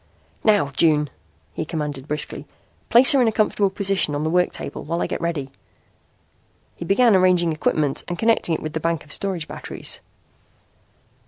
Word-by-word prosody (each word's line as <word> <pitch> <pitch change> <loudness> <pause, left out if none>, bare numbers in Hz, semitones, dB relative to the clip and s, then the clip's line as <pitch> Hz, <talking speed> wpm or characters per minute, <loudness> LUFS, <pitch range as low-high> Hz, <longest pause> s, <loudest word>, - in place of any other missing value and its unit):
"Now, 205 -10 +3
June," 150 0 +2 0.4
he - - -3
commanded 150 -4 -5
briskly, 150 0 -3 0.4
"place 250 +6 +7
her 275 -3 +4
in 240 - +3
a - - +2
comfortable 210 -2 +1
position 195 -6 +2
on 145 - -2
the 160 - -1
work 180 0 +2
table - - -5
while 170 +2 -3
I - - 0
get - - -4
ready." 155 -6 -3 1.2
He 170 - -7
began 215 +4 +4
arranging 180 -3 +3
equipment 155 -2 -1
and 175 - -4
connecting 225 -6 +2
it - - -6
with 155 -1 -5
the 160 - -2
bank 165 -1 -2
of 145 - -12
storage 185 -4 -2
batteries. - - -6
170 Hz, 170 wpm, -22 LUFS, 150-195 Hz, 1.2 s, place